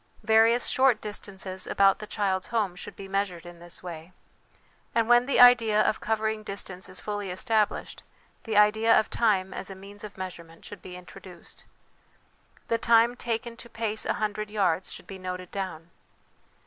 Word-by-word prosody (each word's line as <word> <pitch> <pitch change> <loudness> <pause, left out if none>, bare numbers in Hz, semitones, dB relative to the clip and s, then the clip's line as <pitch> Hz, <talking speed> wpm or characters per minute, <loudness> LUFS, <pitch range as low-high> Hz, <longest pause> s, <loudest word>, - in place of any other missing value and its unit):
Various 225 +2 +4
short 260 -4 +4
distances 190 -2 -5
about 195 -1 +3
the 215 - -8
child's 190 -3 -1
home 210 -6 -1
should - - -8
be 195 - -9
measured 190 -3 -2
in 175 -1 -11
this 175 +1 -9
way; 170 0 -9 0.8
and 230 -1 +2
when 240 +1 +5
the 280 - +1
idea 235 -4 +7
of 215 - +2
covering 220 0 -1
distance 190 -3 -4
is 185 - -5
fully 205 -2 -4
established, 215 +3 -1 0.4
the 220 -3 -1
idea 220 +2 +5
of 220 - -3
time 190 -5 +1
as 195 - -4
a 195 - -8
means 200 +2 -12
of 210 -2 -9
measurement 170 -3 -9
should 205 - -10
be 180 - -9
intro 180 0 -12
duced. 180 -3 -13 1.0
The 230 - 0
time 235 +1 +4
taken 230 -1 -3
to 235 - -11
pace 225 -2 -2
a - - 0
hundred 215 0 -3
yards 190 -4 0
should - - -8
be 195 -1 -9
noted 185 -1 -6
down. 175 -4 -6
205 Hz, 175 wpm, -27 LUFS, 185-220 Hz, 1.0 s, idea